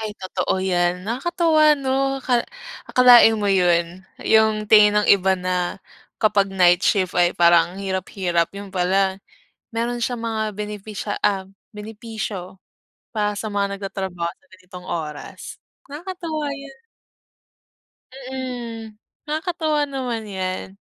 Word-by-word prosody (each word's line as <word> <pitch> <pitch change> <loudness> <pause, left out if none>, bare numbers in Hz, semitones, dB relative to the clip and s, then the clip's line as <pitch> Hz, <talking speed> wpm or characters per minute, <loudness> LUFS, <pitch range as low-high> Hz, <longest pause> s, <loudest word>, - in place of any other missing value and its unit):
Ay, 215 -1 -4
totoo 185 0 -2
'yan. 180 -1 0
Nakakatuwa 310 - +2 0.2
‘no, 265 0 +1 0.2
aka 255 -2 0 0.5
akalain 245 -3 +7
mo 205 -1 -1
‘yon, 175 -1 +1 0.2
yung 220 -1 +3
tingin 210 -1 +6
ng - - -3
iba 190 -1 +4
na 185 0 -2 0.6
kapag 205 -3 +3
night 180 -2 +4
shift 185 -3 +1
ay 175 0 +3
parang 170 0 +4
ang - - -7
hirap 190 -2 -2
hirap, 175 -4 0
yun 200 0 -8
pala 190 +1 +1 0.6
meron 235 +1 -2
siyang 240 0 -2
mga 225 -1 -2 0.2
benepisya 210 0 -5
um, 190 -1 0 0.2
benepisyo, 210 -3 -7 0.6
para 210 -2 0
sa 215 - -4
mga 200 0 -1
nagtatrabaho 190 -3 -4
sa 285 - -33
ganitong 185 -1 -13
oras. 155 -4 -6 0.3
Nakakatuwa 315 -1 -5
'yan. 275 -1 -11 1.3
Mm, 250 -4 -7 0.3
nakakatuwa 310 -1 -1
naman 250 -5 -4
'yan. 190 -1 -4
210 Hz, 125 wpm, -22 LUFS, 185-245 Hz, 1.3 s, akalain